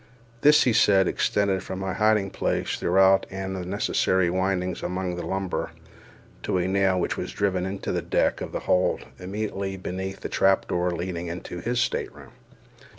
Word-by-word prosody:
This, 150 +1 +6
he 125 - +2
said, 95 -3 +4
extended 100 -2 +1
from 95 0 -6
my 95 0 -3
hiding 105 -1 +2
place - - -1
throughout 95 +2 +4
all 95 0 -4
the 95 -2 -4
necessary 95 -2 +1
windings 95 -1 -1
among 90 0 -2
the 90 - -5
lumber, 95 -1 -3 0.7
to - - -1
a 90 0 0
nail 95 -1 +2
which - - -1
was - - -4
driven 95 -2 0
into 95 +1 -4
the - - -1
deck - - 0
of - - -5
the - - -4
hold, 90 0 +1
immediately 95 0 -4
beneath 95 +1 -5
the - - -3
trap 95 0 +2
door 90 0 0
leading 85 0 -4
into 85 +1 -6
his 120 +6 -1
stateroom. 125 - -3
95 Hz, 170 wpm, -25 LUFS, 90-95 Hz, 0.7 s, This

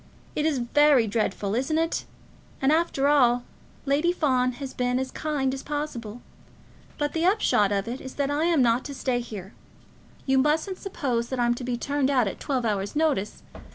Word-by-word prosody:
It 305 +1 +1
is 305 -4 +1
very 265 +1 +4
dreadful, 205 -2 -1
isn't 270 +7 0
it? 330 +1 0 0.5
And, 270 +2 +2
after 310 -4 +2
all, 245 -4 +4 0.4
Lady 295 +5 +2
Fawn 255 -7 +1
has 270 +1 -7
been 250 0 0
as 260 0 -2
kind 285 -4 -1
as 270 - -5
possible. 245 -7 -5 0.7
But 290 -1 -1
the 325 - -1
upshot 355 - +3
of 200 0 -1
it 245 +3 -5
is, 260 - -9
that 280 0 -1
I 300 +3 +1
am 330 -6 +3
not 235 +2 +2
to 280 - -6
stay 250 -2 -1
here. 210 -5 -8 0.7
You 265 -1 +3
mustn't 315 +7 +1
suppose 255 -11 -2
that 260 - -3
I'm 240 0 +3
to 240 - -7
be 245 -1 -2
turned 280 +1 0
out 255 -6 +3
at - - -5
twelve 260 -4 -1
hours' 200 0 -1
notice. 295 -10 0
265 Hz, 190 wpm, -26 LUFS, 240-295 Hz, 0.7 s, very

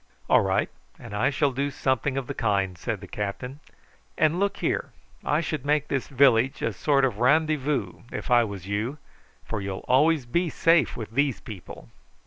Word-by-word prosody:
"All - - +5
right, - - +1 0.3
and 115 -3 -10
I 105 +6 +2
shall 145 0 +1
do 140 +2 -1
something 130 0 -1
of 135 - -2
the - - -5
kind," 100 -4 0
said 105 +2 -4
the 100 - -9
captain. 105 +8 -5 0.6
"And, 160 +3 +2
look 200 0 0
here, - - -1 0.3
I 150 +2 +1
should 155 -5 -3
make 150 0 +1
this 135 -2 -1
village 135 -2 +3
a 115 - 0
sort 140 +1 +2
of 115 -5 -2
randy 155 +5 +4
voo 135 -10 -2
if - - -5
I 120 -1 +6
was 100 -5 -6
you, 110 +8 -2 0.5
for 110 -3 -3
you'll 95 -1 -5
always 145 +2 +3
be 170 +8 0
safe 165 +1 +3
with 110 -2 -6
these 140 +2 +1
people." 95 - -10
130 Hz, 185 wpm, -26 LUFS, 110-145 Hz, 0.6 s, I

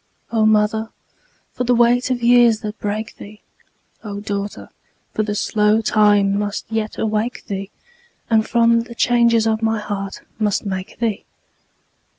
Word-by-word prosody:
O 220 -2 +3
mother, 215 +1 +2 0.6
for - - -2
the 245 0 +2
weight 240 +2 +3
of 245 -2 -2
years 235 -2 +5
that 215 0 -6
break 215 +2 -4
thee! 210 +1 -12 0.6
O 205 -2 -6
daughter, 205 0 -5 0.4
for 215 - 0
slow 210 +1 +2
time 205 -2 +3
must 205 -1 -3
yet 220 -1 -2
awake 220 +2 -2
thee, 195 -2 -5 0.6
And 220 -1 +3
from 235 0 +4
the 235 - -11
changes 235 -2 +3
of 220 0 0
my 225 0 +1
heart 200 -2 -5 0.2
must 210 -1 0
make 190 -1 -5
thee! 225 -3 -2
220 Hz, 145 wpm, -20 LUFS, 205-230 Hz, 0.6 s, years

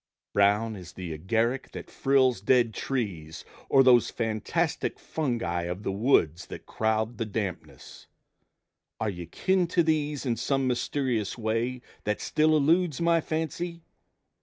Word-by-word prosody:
Brown 105 +2 +3
as 90 -2 -10
the 90 -3 -6
agaric 115 - -1
that - - -8
frills 130 -6 +2
dead 120 +1 +3
trees, 90 - -4 0.2
Or 135 - +6
those 125 -2 +5
fantastic 110 -2 -1
fungi 120 - -2
of 90 +4 -5
the 100 - -1
woods 95 - +2
That - - -9
crowd 110 +1 -1
the 115 - 0
dampness 90 - -6 0.9
are 110 -2 -1
you 90 -2 -8
kin 185 - +1
to 170 0 +2
these 150 -3 0
In 120 -3 0
some 135 +3 0
mysterious 125 -3 -1
way 115 +3 -2 0.2
that 105 -2 -1
still 155 0 +2
eludes 160 +1 +2
My 170 -1 +3
fancy? 165 +2 -4
115 Hz, 135 wpm, -27 LUFS, 100-140 Hz, 0.9 s, Or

